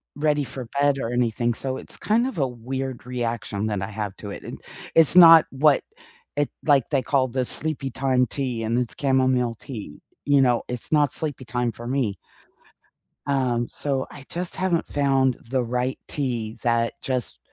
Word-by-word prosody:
ready 150 -1 +1
for 130 -1 -7
bed 145 -1 +3
or 115 - -3
anything, 120 -1 +1
so, 130 +2 -4
it's - - -7
kind 230 +4 +1
of 245 -9 -6
a 135 - +2
weird 130 +1 -5
reaction 115 -4 -3
that 105 -3 -2
I 95 - -3
have 105 -2 -4
to 100 - -8
it, - - -8
and - - -8 0.4
it's 165 +1 +6
not 165 -2 +10
what 145 +2 +4 0.6
it 145 - +1 0.2
like, 140 -4 +3
they 140 -4 +1
call 135 -1 +1
the 130 +1 -2
Sleepytime 135 -2 +1
tea 125 -5 -3
and 115 +3 0
it's 125 - -3
chamomile 130 -3 +2
tea. 105 - -9 0.3
You 145 -1 +4
know, 125 -2 +2
it's 125 -1 -4
not 145 -3 +3
sleepy 145 -4 -4
time 120 +1 -1
for 120 0 -10
me. 125 -8 -1 1.1
Um, 125 -4 +1
so 135 -2 -2
I 135 - -12
just 175 0 -4
haven't 180 -3 0
found 135 -3 +2
the 130 -1 +1
right 125 +2 -2
tea 120 -6 -3
that 115 -1 +1
just 130 -4 -3
130 Hz, 175 wpm, -24 LUFS, 120-140 Hz, 1.1 s, not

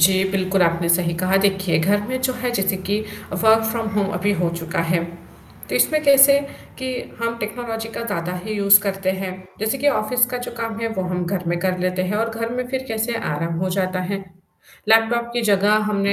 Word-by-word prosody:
जी, 190 +3 +5
बिल्कुल 190 -1 +1
आपने 170 0 +1
सही 170 0 +2
कहा, 185 +3 +1
देखिए 195 -3 +2
घर 200 +6 +2
में 255 +2 -3
जो 255 0 +1
है 250 0 -2
जैसे 195 -3 0
कि 205 +2 +1 0.4
वर्क 220 0 +5
फ्रॉम 225 -1 -2
होम 205 -1 +2
अभी 200 +3 +1
हो 175 - +2
चुका 165 0 -3
है, 170 0 0 0.6
तो - - -3
इसमें 310 -1 +2
कैसे 280 0 +7 0.4
कि 260 0 -3 0.3
हम 230 0 -1
टेक्नोलॉजी 225 +1 -4
का - - -3
ज़्यादा 180 -5 -3
ही 215 - -4
यूज़ 200 -1 +6
करते 195 -1 -1
हैं, 185 -1 -3 0.3
जैसे 220 +5 -1
कि 290 - +2
ऑफिस 250 -3 +2
का 250 0 -4
जो - - -7
काम 225 -1 -4
है 230 - -1
वो 190 - +1
हम 180 0 -2
घर 185 -1 -2
में 175 0 0
कर 185 0 0
लेते 185 0 -1
हैं 190 +3 -1
और 225 +1 0
घर 230 0 -3
में 250 0 -2
फिर 265 0 -3
कैसे 225 +1 -2 0.2
आराम 165 +3 -2
हो 185 - -1
जाता 185 0 -1
है। 195 -1 -3 0.6
लैपटॉप 230 +2 +3
की 240 - 0
जगह 205 -1 +3 0.2
हमने 200 -1 +1
200 Hz, 215 wpm, -21 LUFS, 185-230 Hz, 0.6 s, कैसे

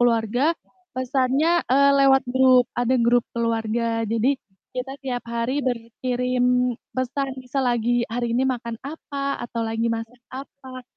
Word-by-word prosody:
keluarga, 240 +4 +2 0.4
pesannya, 265 +6 +1
eee, 280 +1 +5
lewat 270 -1 +5
grup, 255 0 +5
ada 245 +1 +1
grup 240 +1 +4
keluarga. 230 0 -1
Jadi, 230 +5 +1 0.4
kita 255 +2 -4
tiap 250 -2 -3
hari 235 +4 -1
berkirim 250 +1 0 0.2
pesan, 265 +2 -2
misal 260 +2 -2
lagi 240 0 +1
hari 240 +1 -2
ini 255 - +2
makan 235 -3 -2
apa, 280 -1 -4
atau 235 -1 -3
lagi 225 +1 -1
masak 230 +2 -5 0.2
apa 260 -1 -9
250 Hz, 130 wpm, -23 LUFS, 235-265 Hz, 0.4 s, eee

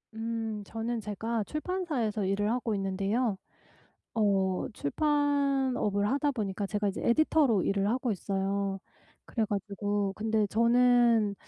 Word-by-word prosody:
음. 225 -2 -3
저는 225 +2 -3
제가 215 +2 -2
출판사에서 300 - -2
일을 200 +2 0
하고 235 -2 -1
있는데요 195 +3 0 0.8
어 195 -4 +1
출판업을 275 - +1
하다 285 +3 +1
보니까 205 -5 -3
제가 210 0 -1
이제 195 - -4
에디터로 265 - +3
일을 195 0 +1
하고 245 +1 0
있어요. 195 0 -2 0.5
그래 225 - -1
가지고 205 -1 -2
근데 220 0 +1
저는 235 -1 +4
220 Hz, 270 characters per minute, -29 LUFS, 200-245 Hz, 0.8 s, 저는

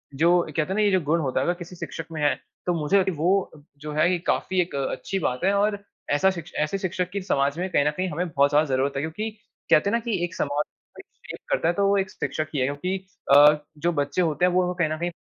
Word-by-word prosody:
जो 170 +4 +4 0.2
कहते - - +4
हैं 185 +5 -2
ना, 215 - +2
ये 205 -1 +3
जो 185 -2 +3
गुण 160 +3 +1
होता 130 -2 0
है, 135 - 0
अगर 175 - +2
किसी 175 +1 -9
शिक्षक 165 -1 -6
में 155 -2 -5
है, 145 -3 +3 0.3
तो 175 - +1
मुझे 175 +7 +3
लग 190 -1 +1
वो 175 +5 +3 0.4
जो 150 +1 -7
है, 155 +4 +3
ये 180 - 0
काफ़ी 185 -1 +1
एक 170 -4 -4
अच्छी 140 +7 -2
बात 125 -3 -2
है 195 +1 +3
और 205 0 +1 0.3
ऐसा 170 +7 +4
शिक्ष 170 -2 -8
ऐसे 175 +6 -2
शिक्षक 180 -2 -2
की 200 - -2
समाज 140 -5 0
में 185 +1 -2
कहीं 145 - +2
न 150 - +3
कहीं 185 +4 -2
हमें 175 +3 -2
बहुत 140 -1 +3
ज़्यादा 150 +2 +3
ज़रूरत 135 +2 0
है, 135 - -1
क्योंकि 175 +8 -3 0.4
कहते 175 +6 +5
हैं - - -2
ना - - +2
कि 225 -7 -2
एक 170 -1 -3
समाज 145 +1 0 0.3
कोई - - -10 0.3
चेंज - - -6
करता 165 - +1
है 175 - +3
तो 200 +2 +1
वो 200 0 +3
एक 190 -1 0
शिक्षक 155 0 -3
ही 140 - -1
है 130 - +2
क्योंकि 165 +8 -2 0.4
अ, 150 +1 +8 0.2
जो 170 +3 0
बच्चे 145 +4 0
होते 170 +1 +1
हैं, 180 - +3
वो 180 0 +1
कहीं 170 -3 0
न 155 - -2
कहीं 175 +1 -2
170 Hz, 270 wpm, -25 LUFS, 150-185 Hz, 0.4 s, अ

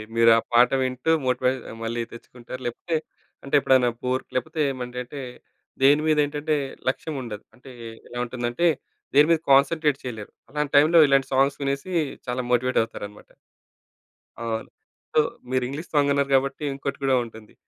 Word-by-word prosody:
మీరు 115 0 +6
ఆ - - +4
పాట 120 +1 +6
వింటూ 130 +4 -1
మోటివేట్ 130 +1 +1 0.2
మళ్ళీ 115 +1 -2
తెచ్చుకుంటారు. 125 +2 -10
లేపోతే 160 +8 -3 0.5
అంటే 140 - -1
ఎప్పుడైనా 130 -3 +4
బోర్ 130 +1 0
లేకపోతే 155 +5 -3
ఏమంటేటే 125 +2 -6 0.6
దేని 145 +3 +6
మీద 155 -1 +3
ఏంటంటే 150 +1 -1 0.3
లక్ష్యం 150 +4 -4
ఉండదు. 110 -4 -7
అంటే 130 +1 -15 0.4
ఎలా 120 - -9
ఉంటుందంటే 120 +5 -2 0.5
దేనిమీద 155 +3 +5
కాన్సంట్రేట్ 145 +1 +4
చేయలేరు. 110 -5 -7 0.2
అలాంటి 150 +1 -3
టైంలో 155 +4 +6
ఇలాంటి 135 -1 +3
సాంగ్స్ 135 +2 +2
వినేసి 140 +6 -2 0.4
చాలా 125 +1 -1
మోటివేట్ 125 +1 +1
అవుతారన్నమాట. 105 -2 -9 1.1
అవును. 115 -1 -3 0.4
సో - - +4 0.3
మీరు 130 -1 +1
ఇంగ్లీష్ 145 +6 -7
సాంగ్ 145 -1 +3
అన్నారు 140 0 +1
కాబట్టి 135 +2 0
ఇంకోటి 140 0 -4
కూడా 135 -1 +3
ఉంటుంది. 110 -2 -13
130 Hz, 145 wpm, -24 LUFS, 125-145 Hz, 1.1 s, మీరు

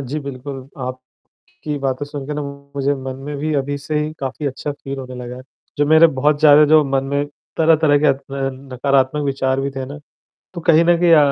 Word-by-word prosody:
जी, 140 +3 -4
बिल्कुल 135 -1 -7
आपकी 130 0 -8 0.6
बातें 135 +1 -2
सुनके 145 0 -6
ना 150 - -3 0.3
मुझे 140 0 +1
मन 130 0 -5
में 145 - -4
भी 155 +2 -2
अभी 140 +1 -1
से 150 +2 -2
ही 150 0 -2
काफ़ी 135 +2 -4
अच्छा 140 +2 -4
फ़ील 140 -1 -7
होने 130 -1 -8
लगा 125 0 -7
है, 130 - -9 0.4
जो 145 - +3
मेरे 160 +2 +7
बहुत 145 +2 +2
ज़्यादा 150 -1 +7
जो 155 +1 +5
मन 135 -1 0
में 140 0 +1 0.3
तरह-तरह 160 -2 +4
के 150 - +1
अ - - +6
अ, 135 - -15 0.3
नकारात्मक 135 +2 0
विचार 135 -1 0
भी 140 - -1
थे 135 -1 -5
ना 145 +3 -9 0.5
तो 170 - -6
कहीं 165 0 +5
न 175 0 +4
कहीं 175 -1 +4
अ, - - +8
140 Hz, 210 wpm, -19 LUFS, 135-150 Hz, 0.6 s, अ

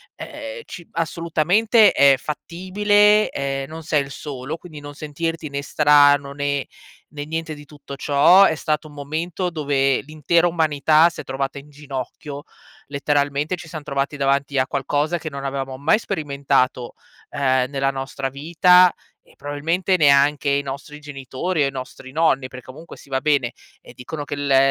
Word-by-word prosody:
ehm, - - -8
ci 170 -3 -10
assolutamente 170 +7 +2
è 140 -1 +5
fattibile, 205 +8 +2
ehm, 135 0 -3
non 160 +1 -8
sei 150 -2 +1
il 140 - -11
solo, 140 +1 -6
quindi 160 -4 -11
non 145 0 -9
sentirti 155 +1 -4
né 140 0 -4
strano 145 -1 +4
né 140 -1 -2 0.5
né 145 - -4
niente 160 +1 -4
di 145 -1 -11
tutto 145 -1 -11
ciò, 145 +8 +5
è 160 - +3
stato 155 0 -2
un 150 - -15
momento 160 +5 -3
dove 140 -4 0
l'intera 155 +4 +1
umanità 160 -1 +3
si - - -8
è - - -12
trovata 135 +1 -4
in 140 +1 -11
ginocchio, 145 0 -7 0.4
letteralmente 145 +3 0
ci 170 -2 -12
siam 155 -3 -7
trovati 140 0 -2
davanti 140 0 0
a 130 0 +2
qualcosa 145 +5 -1
che 160 - -6
non 140 -1 -7
avevamo 135 -1 -4
mai 155 +10 +3
sperimentato, 140 - -1 0.4
ehm, 130 -2 +1
nella 135 -1 0
nostra 135 0 -4
vita, 170 +6 +4 0.3
e - - -25
probabilmente 160 +7 -1
neanche 145 -2 +4
i 140 0 +2
nostri 140 +2 -8
genitori 145 +3 -3
o 140 - +2
i - - -4
nostri 130 0 -9
nonni. 135 -4 +1
Per 130 0 -10
comunque, 145 +7 -12
sì - - -16
va 135 -1 -2
bene, 140 -5 +1 0.3
ehm, - - -15
dicono 145 +4 -7
che 145 - -5
la 140 -1 +2
145 Hz, 165 wpm, -21 LUFS, 140-160 Hz, 0.5 s, è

